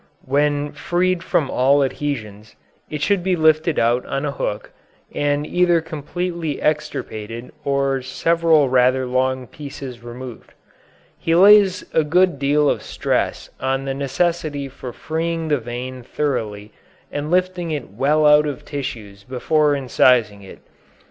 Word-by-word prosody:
When 145 +1 +1
freed 175 +4 0
from 155 -5 0
all 140 +3 +3
adhesions, 115 -7 -4 0.3
it 150 -1 -4
should 200 +3 +2
be 185 0 +1
lifted 160 0 +3
out 120 +2 +2
on 135 +2 -2
a 145 - -1
hook, 105 -6 -4 0.4
and 145 0 0
either 175 0 +3
completely 165 0 -4
extirpated 120 -7 -3
or 140 -1 0
several 165 +3 +2
rather 130 0 +3
long 130 +1 0
pieces 140 -3 -9
removed. 120 0 -10 0.6
He 165 - +1
lays 200 +1 +6
a 160 - +3
good 175 0 +2
deal 145 +1 +2
of - - +1
stress - - -2
on 135 +1 -1
the 135 - -2
necessity 145 +1 -1
for 130 -1 -8
freeing 165 +3 -3
the 145 -2 +2
vein 125 +2 -6
thoroughly 115 -6 -3 0.4
and 145 +1 -4
lifting 180 -1 0
it 145 -9 -4
well 145 +8 +2
out 150 0 +6
of 145 -3 -6
tissues 110 -8 -6
before 145 +5 +1
incising 125 -5 +2
it. 95 - -13
145 Hz, 135 wpm, -20 LUFS, 130-160 Hz, 0.6 s, lays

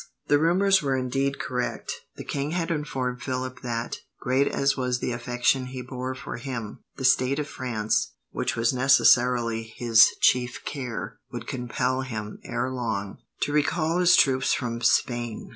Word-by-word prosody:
The 145 - +5
rumours 190 +4 +4
were 135 -2 0
indeed 135 +2 -1
correct. 125 -1 -3 0.2
The - - -7
king 140 0 -3
had 170 -1 -1
informed 130 -5 -2
Philip 130 -1 -4
that, 120 -1 -3 0.2
great 130 +3 +2
as 140 0 +1
was 125 -2 0
the 125 - -3
affection 125 +2 0
he 125 0 -6
bore 130 +1 -5
for 130 - -6
him, 120 -4 -6 0.2
the 130 - -3
state 130 +1 +3
of 150 -1 -2
France, 115 -6 -1 0.2
which - - -2
was 115 +2 +1
necessarily 125 -3 +4 0.2
his 115 -2 +6
chief 125 -1 +2
care, 125 -5 -5
would - - -6
compel 125 +1 -1
him, 110 -5 -6
ere 130 - -2
long, 110 -6 -3 0.2
to 145 - -1
recall 155 +3 +1
his 180 -1 +6
troops 130 -1 +3
from 115 -2 -3
Spain. 120 -1 0
125 Hz, 160 wpm, -26 LUFS, 120-140 Hz, 0.2 s, his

